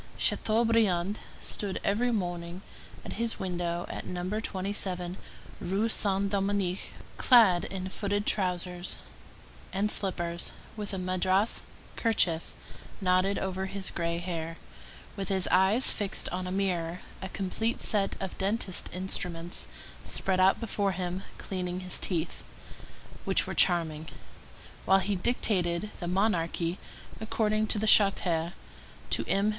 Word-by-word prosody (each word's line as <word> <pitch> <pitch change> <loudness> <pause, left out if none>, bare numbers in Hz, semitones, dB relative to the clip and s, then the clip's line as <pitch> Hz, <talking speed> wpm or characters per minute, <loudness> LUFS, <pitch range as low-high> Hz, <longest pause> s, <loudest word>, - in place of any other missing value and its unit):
Chateaubriand 215 -4 +2 0.2
stood 200 -2 -2
every 225 +5 +2
morning 175 -4 -2 0.4
at - - -5
his 235 -1 +1
window 175 -2 -2
at - - -5
No. 180 +4 -2
27 185 -3 -2 0.4
Rue 195 +5 0
Saint 200 -2 +2
Dominique, 195 -2 0 0.3
clad 220 -9 +6
in 190 -1 -4
footed 205 +1 -1
trousers, 180 -2 0 0.8
and 205 +2 +1
slippers, 175 -3 -1 0.2
with 210 -2 -4
a 195 - -3
madras 185 +3 +1 0.4
kerchief 180 -8 +1 0.4
knotted 185 +1 +3
over 190 0 -2
his 195 0 -5
gray 170 0 -1
hair, 165 -2 -4 0.6
with 195 -3 -3
his 190 -2 +3
eyes 190 +7 +5
fixed 205 -2 -2
on 185 0 -3
a - - -3
mirror, 180 -3 -1 0.2
a 190 - -4
complete 215 +5 -2
set 200 -2 +1
of 190 -2 -4
dentist's 195 -1 0
instruments 175 -2 -2 0.4
spread 185 -1 0
out 190 +1 +5
before 205 -4 0
him, 180 +1 -3 0.2
cleaning 180 -1 -3
his 185 -1 0
teeth, 170 -3 -1 0.8
which - - +2
were - - -4
charming, 160 -3 +3 0.8
while 190 - +6
he 195 +1 0
dictated 185 -2 +1
The 175 - -3
Monarchy 175 -2 +1 0.4
according 215 -1 +1
to 215 - +2
the 210 - 0
Charter 180 -5 +4 0.6
to - - +1
M. 200 +2 +2
190 Hz, 125 wpm, -29 LUFS, 175-205 Hz, 0.8 s, clad